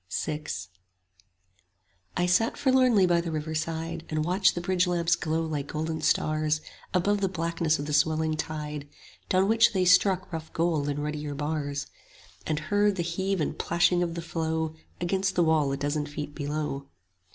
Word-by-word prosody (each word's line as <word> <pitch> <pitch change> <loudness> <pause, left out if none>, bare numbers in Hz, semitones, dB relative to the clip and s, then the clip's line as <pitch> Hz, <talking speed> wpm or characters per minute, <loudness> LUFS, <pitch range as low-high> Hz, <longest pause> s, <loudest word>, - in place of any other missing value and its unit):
VI 155 -1 -4 1.7
I 180 - +2
sat 205 +6 +2
forlornly 255 -7 +4
by 175 -1 +3
the 170 - -4
river 155 0 -3
side, 165 +1 -3
And 155 -1 -1
watched 185 +2 +3
the 175 - -2
bridge 180 +1 +1
lamps 170 -1 +2
glow 160 +1 -1
like 150 -3 -3
golden 160 +1 -3
stars 155 0 +1 0.3
Above 200 +3 +1
the 195 - +1
blackness 165 -2 0
of 145 - -4
the 150 - -3
swelling 155 +1 +2
tide, 150 -2 -5 0.4
Down 190 +1 +3
which 225 +1 +5
they 185 -2 +2
struck 185 0 +4
rough 160 -1 -5
gold 160 -4 +1
in 145 0 -2
ruddier 150 -1 -3
bars; 145 -1 -2 0.6
And 155 - 0
heard 205 +6 +2
the 175 - -1
heave 190 +3 -1
and 155 - -2
plashing 175 +1 +2
of 170 -1 -1
the 170 - -4
flow 160 -1 -1
5 160 - -17 0.2
Against 190 +2 0
the 175 - +4
wall 155 -3 +3
a 135 - -1
dozen 145 +1 -1
feet 145 0 -6
below. 145 -2 -3
160 Hz, 175 wpm, -27 LUFS, 150-180 Hz, 1.7 s, which